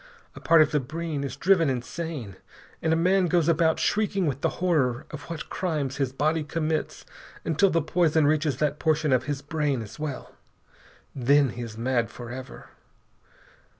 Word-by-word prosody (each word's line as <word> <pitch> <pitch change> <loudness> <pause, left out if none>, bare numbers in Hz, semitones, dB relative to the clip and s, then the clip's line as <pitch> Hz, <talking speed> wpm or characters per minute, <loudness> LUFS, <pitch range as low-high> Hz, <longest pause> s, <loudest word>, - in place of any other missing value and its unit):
A - - -9
part 165 -1 +6
of 150 - -3
the 150 - +2
brain 155 +2 -4
is 140 -2 -4
driven 165 0 +3
insane, 130 - -4 0.5
and 160 - +1
a - - +4
man 185 +2 +3
goes 170 -2 +2
about 160 -1 +3
shrieking 200 -3 +1
with 140 -2 -2
the - - +2
horror 145 -9 +1
of 155 0 -9
what 165 -2 -5
crimes 150 -8 -2
his 135 -2 0
body 155 +4 0
commits 155 +1 -2 0.4
until 165 +5 +3
the 165 -3 +1
poison 160 -2 +2
reaches 150 -1 +1
that 150 -1 0
portion 155 -3 +2
of 130 0 +2
his 145 0 -3
brain 145 -4 -1
as 105 - -12
well. 150 -3 -5 0.8
Then 140 +2 +3
he 120 +1 -7
is 115 -2 -7
mad 120 -1 0
forever. 125 +2 -9
150 Hz, 170 wpm, -26 LUFS, 135-165 Hz, 0.8 s, part